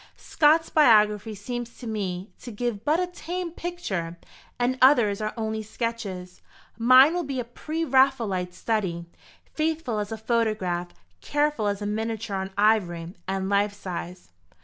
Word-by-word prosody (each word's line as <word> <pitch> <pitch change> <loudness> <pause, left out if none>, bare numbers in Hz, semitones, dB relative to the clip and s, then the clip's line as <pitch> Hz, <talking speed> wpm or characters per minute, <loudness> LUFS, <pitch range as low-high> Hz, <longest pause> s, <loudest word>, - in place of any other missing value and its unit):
Scott's 315 +2 +3
biography 215 -6 +4
seems 240 +3 -6
to 245 - -10
me 195 -3 -4
to 245 - -8
give 230 -1 -3
but 305 +6 +2
a 365 - +1
tame 355 0 -5
picture, 200 - -4 0.4
and 250 +1 0
others 235 -7 +5
are 215 0 -1
only 220 -1 -2
sketches. 210 -5 -5 0.3
Mine 255 +6 +7
will 355 0 -1
be 275 -3 -3
a - - -1
pre 310 +7 -4
Raphaelite 235 - +2
study 185 -5 -2 0.5
faithful 310 -8 -1
as 205 0 -4
a 225 - -3
photograph, 215 -6 -1 0.3
careful 295 -7 0
as 200 0 -2
a - - -3
miniature 220 0 -3
on 190 0 -3
ivory, 180 -5 +1
and 190 0 -2
life 200 +1 +1
size." 180 - -7
220 Hz, 150 wpm, -25 LUFS, 200-260 Hz, 0.5 s, Mine